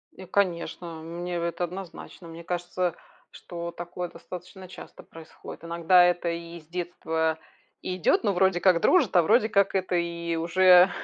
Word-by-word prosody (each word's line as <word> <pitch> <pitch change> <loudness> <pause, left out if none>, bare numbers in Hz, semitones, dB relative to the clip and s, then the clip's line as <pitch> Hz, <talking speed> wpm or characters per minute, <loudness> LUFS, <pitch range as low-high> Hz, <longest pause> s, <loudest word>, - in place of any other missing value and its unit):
Э, 190 - -10
конечно, 170 -3 -2
мне 175 +2 -5
это 170 +1 -2
однозначно. 180 -1 -8
Мне 165 +1 -10
кажется, 175 0 -2 0.4
что 170 -1 -7
такое 175 0 -6
достаточно 185 +1 -10
часто - - -12
происходит. 165 0 -12
Иногда 170 +2 +4
это 175 -1 +1
и 170 0 -6
с 155 - -26
детства 160 -2 -2 0.4
и 185 0 -4
идет, 180 - +2
но 200 -2 +1
вроде 190 -1 +2
как 180 -3 +3
дружат, 305 - +3
а 175 - +7
вроде 220 +6 +3
как 200 -2 +2
это 185 -1 0
и 170 -1 -2
уже, 180 +2 +6
175 Hz, 160 wpm, -26 LUFS, 170-185 Hz, 0.4 s, а